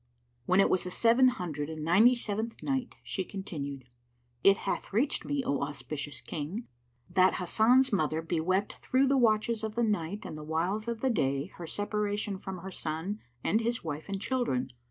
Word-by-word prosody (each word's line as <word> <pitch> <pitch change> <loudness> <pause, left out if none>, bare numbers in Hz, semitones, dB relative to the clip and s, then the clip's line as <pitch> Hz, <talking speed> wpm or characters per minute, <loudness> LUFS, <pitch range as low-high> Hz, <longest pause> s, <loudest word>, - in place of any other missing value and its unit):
When 185 +1 +4
it 195 - +6
was 185 - +2
the 180 - -4
Seven 235 +7 +5
Hundred 160 - -2
and 155 -1 -5
Ninety 220 +9 +6
seventh 225 0 -3
Night, 265 -3 -1
She 190 - -2
continued, 145 -9 -6 0.6
It 195 0 +7
hath - - -2
reached 240 +8 +1
me, 285 -2 -1
O 140 - 0
auspicious 145 0 -4
King, 170 +10 -5 0.4
that 185 0 +4
Hasan's 225 +8 +4
mother 160 -3 +1
bewept 180 +4 0
through 260 +1 +3
the 275 +1 +3
watches 225 -1 +2
of 220 -1 -3
the 235 - +2
night 205 -3 -1
and - - -6
the 155 - -7
whiles 175 +8 -1
of 230 -1 -3
the 265 - +2
day 140 - 0
her 170 - -7
separation 205 0 -1
from 190 -1 -6
her 190 - -6
son 165 +5 -4 0.2
and 220 - +2
his 235 +1 -1
wife 155 +2 -5
and 195 -1 -2
children. 200 - -1
195 Hz, 180 wpm, -30 LUFS, 160-225 Hz, 0.6 s, It